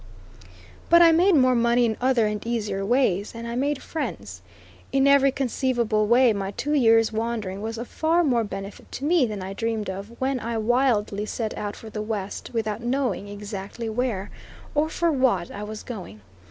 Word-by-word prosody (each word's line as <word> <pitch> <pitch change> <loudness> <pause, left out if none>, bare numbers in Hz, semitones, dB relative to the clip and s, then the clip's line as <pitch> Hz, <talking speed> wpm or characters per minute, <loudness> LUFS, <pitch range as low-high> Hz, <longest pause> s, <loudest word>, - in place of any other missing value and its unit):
But 340 +1 +8
I 335 - +7
made 350 +3 +4
more 255 -3 +5
money 235 0 +3
in 220 -1 0
other 255 -3 +3
and 210 -1 -2
easier 215 -4 -2
ways, 205 -3 +1
and 230 0 -6
I 235 - -4
made 280 +2 -1
friends. 100 - -5 0.5
In 270 0 +3
every 280 -1 +5
conceivable 240 -5 0
way 240 0 +5
my 195 -1 -3
two 290 +9 -3
years' 225 -5 +4
wandering 220 -4 -3
was 225 +1 -4
of 235 +2 -5
far 330 +2 +1
more 245 -7 +2
benefit 195 -1 -8
to 275 - -4
me 315 -5 +3
than 210 -3 -5
I 190 +1 -5
dreamed 220 -1 -2
of 200 +5 -9
when 265 0 0
I 230 0 -3
wildly 220 -3 +1
set 220 -1 -3
out 205 -1 -4
for 220 - -11
the 210 - -4
West 210 -2 -4
without 220 -2 -2
knowing 245 -4 -1
exactly 205 +2 -6
where, 220 -4 -2 0.4
or 300 +1 +1
for 340 +1 +1
what, 255 - +1
I 205 - -7
was 210 +1 -6
going. 185 - -8
230 Hz, 185 wpm, -24 LUFS, 205-260 Hz, 0.5 s, But